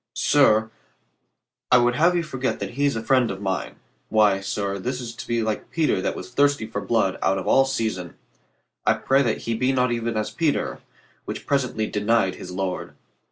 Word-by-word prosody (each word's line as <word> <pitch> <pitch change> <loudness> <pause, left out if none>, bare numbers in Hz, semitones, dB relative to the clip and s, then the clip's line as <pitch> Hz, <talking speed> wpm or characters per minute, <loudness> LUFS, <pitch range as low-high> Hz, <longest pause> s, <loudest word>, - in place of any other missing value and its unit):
"Sir, 110 -6 +3 1.0
I 125 - +8
would 120 0 +3
have 170 +5 +3
you 170 - +1
forget 135 -4 -3
that - - -4
he 140 +4 0
is 140 - -1
friend 125 +2 +2
of 95 - -5
mine. 95 -1 -3 0.3
Why, 105 -3 +4
sir, 100 0 -3
this 125 +6 -3
is 120 -2 -6
to 115 - -9
be 115 -1 0
like 110 -1 -3
Peter 155 - +1
that - - -2
was - - -8
thirsty 140 -2 +2
for 110 - -4
blood 110 -5 0
out 95 +1 +2
of 95 - -4
all 135 - +5
season. 110 -9 -3 0.7
I - - +3
pray 135 +1 +2
that 115 -5 0
he 115 - -2
be 125 +4 +1
not 125 -2 +1
even 115 -1 -2
as 110 - -2
Peter, 160 -3 -1 0.5
which - - -6
presently 125 -6 0
denied 105 -2 +1
his 90 - -9
Lord." 90 0 -4
115 Hz, 195 wpm, -23 LUFS, 105-135 Hz, 1.0 s, I